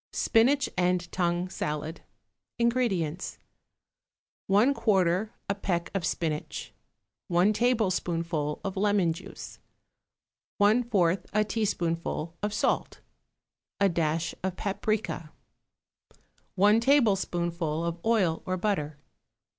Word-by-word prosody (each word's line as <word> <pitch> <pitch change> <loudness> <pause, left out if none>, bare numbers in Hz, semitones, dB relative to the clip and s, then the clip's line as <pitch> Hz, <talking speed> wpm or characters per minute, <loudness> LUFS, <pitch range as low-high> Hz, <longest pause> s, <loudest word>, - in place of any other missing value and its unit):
=Spinach 265 +5 +3
and 180 -1 +1
Tongue 175 0 0
Salad.= 155 -2 -4 0.6
INGREDIENTS. 225 -9 0 1.1
1/4 205 -4 +3 0.2
a 200 - +1
peck 175 -4 -2
of 195 -3 -1
spinach. 155 -3 -3 0.5
1 180 +4 +3
tablespoonful 175 -10 0
of 195 -1 -3
lemon 200 -4 +2
juice. 165 - -10 1.0
1/4 205 -5 +3
a 215 +1 +3
teaspoonful 170 -6 -2
of 210 - -1
salt. 210 - -1 0.8
A 200 -1 +4
dash 165 -1 0
of 190 -1 -1
paprica. 200 -4 -2 1.3
1 205 +4 +5
tablespoonful 175 - +1
of 170 0 -3
oil 200 -8 +2
or 185 0 0
butter. 165 -7 -1
185 Hz, 90 wpm, -28 LUFS, 170-210 Hz, 1.3 s, 1